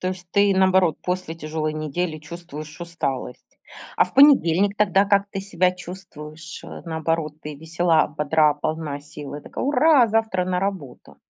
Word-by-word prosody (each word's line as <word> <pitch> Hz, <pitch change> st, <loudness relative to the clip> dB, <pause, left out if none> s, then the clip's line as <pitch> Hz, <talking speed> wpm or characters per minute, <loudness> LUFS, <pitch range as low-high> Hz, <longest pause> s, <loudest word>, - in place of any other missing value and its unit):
То 185 Hz, -, -1 dB
есть 180 Hz, -1 st, -6 dB
ты, 200 Hz, -1 st, +4 dB
наоборот, 185 Hz, -4 st, +3 dB
после 180 Hz, -2 st, -3 dB
тяжелой 155 Hz, -1 st, -3 dB
недели 155 Hz, +2 st, -3 dB
чувствуешь 155 Hz, 0 st, -10 dB
усталость. 140 Hz, -7 st, -5 dB, 0.4 s
А -, -, +5 dB
в -, -, -10 dB
понедельник 205 Hz, -, +5 dB
тогда 195 Hz, -2 st, +3 dB
как 200 Hz, 0 st, +2 dB
ты 195 Hz, -, -4 dB
себя 185 Hz, -2 st, +1 dB
чувствуешь? 170 Hz, -3 st, -10 dB
Э, -, -, -9 dB
наоборот, 160 Hz, -1 st, -2 dB
ты 150 Hz, 0 st, -6 dB
весела, 165 Hz, +1 st, +1 dB
бодра, 150 Hz, 0 st, +2 dB
полна 150 Hz, -1 st, -4 dB
сил, 145 Hz, -1 st, -9 dB
и 150 Hz, -, -6 dB
такая: -, -, -5 dB
"Ура, 290 Hz, -2 st, +5 dB
завтра 220 Hz, -4 st, 0 dB
на 180 Hz, 0 st, -1 dB
работу!". 185 Hz, -11 st, -5 dB
170 Hz, 160 wpm, -23 LUFS, 155-190 Hz, 0.4 s, А